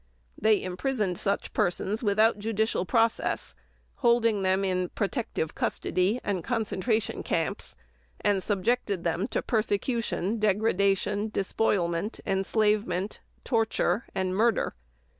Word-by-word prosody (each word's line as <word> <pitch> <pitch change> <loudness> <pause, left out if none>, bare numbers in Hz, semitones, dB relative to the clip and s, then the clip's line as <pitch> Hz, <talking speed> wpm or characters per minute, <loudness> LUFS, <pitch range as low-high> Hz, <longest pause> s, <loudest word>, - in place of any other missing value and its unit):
They 215 -1 +3
imprisoned 185 0 -1
such 200 - -1
persons 195 +4 0
without 215 0 +3
judicial 220 -2 0
process, 230 -2 +1 0.4
holding 235 -4 +3
them 190 +1 +2
in 185 -1 0
"protective 210 - -2
custody" 190 +7 0
and 190 -5 -1
concentration 220 -1 -1
camps, - - -2 0.4
and 200 -2 +1
subjected 205 -1 0
them 175 +4 0
to - - -2
persecution, 220 -1 0
degradation, 205 0 +1
despoilment, 195 -2 0
enslavement, 200 -1 0 0.2
torture, 225 -3 +1
and 185 -1 -1
murder. 225 +3 +2
205 Hz, 105 wpm, -28 LUFS, 190-225 Hz, 0.4 s, They